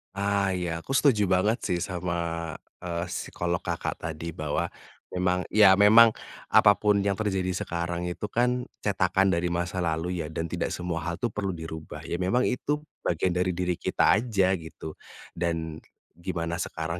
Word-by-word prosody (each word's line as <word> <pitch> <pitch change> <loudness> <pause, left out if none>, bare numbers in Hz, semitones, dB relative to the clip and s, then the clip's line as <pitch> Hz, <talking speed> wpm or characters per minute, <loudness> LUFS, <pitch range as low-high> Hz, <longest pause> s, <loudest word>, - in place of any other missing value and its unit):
Ah, 100 0 +1
iya 85 -2 -2
aku 85 - -8
setuju 130 -8 +4
banget 95 +5 +2
sih 90 - 0
sama, 85 -3 -3 0.3
eee, 85 -1 -3
psikolog 85 -1 -2
Kakak - - -3
tadi 80 +1 -5
bahwa, 80 +1 -2 0.4
memang 90 0 0
ya 105 -3 +7
memang 110 +3 +8 0.4
apa 105 - +7
pun 105 -1 +2
yang 100 0 +1
terjadi 95 -3 -1
sekarang 85 0 -3
itu 105 - -4
kan 125 +3 0 0.2
cetakan 95 -1 +2
dari 85 +1 +1
masa 85 +1 -2
lalu 85 +2 -1
ya? - - -5
Dan 80 +1 -3
tidak 90 -1 -2
semua 85 -2 -3
hal 85 +1 -2
itu 120 - +1
perlu 100 -2 -2
dirubah 80 -1 -7
ya - - -2
memang 95 +8 +2
itu 150 +4 -1 0.2
bagian 90 +2 +1
dari 90 +1 +1
diri 90 0 0
kita - - +3
aja 100 -6 +2
gitu, 80 -1 -9 0.4
dan 80 -2 -2 0.4
gimana 85 -1 -3
sekarang 85 +1 -3
90 Hz, 160 wpm, -27 LUFS, 85-100 Hz, 0.4 s, memang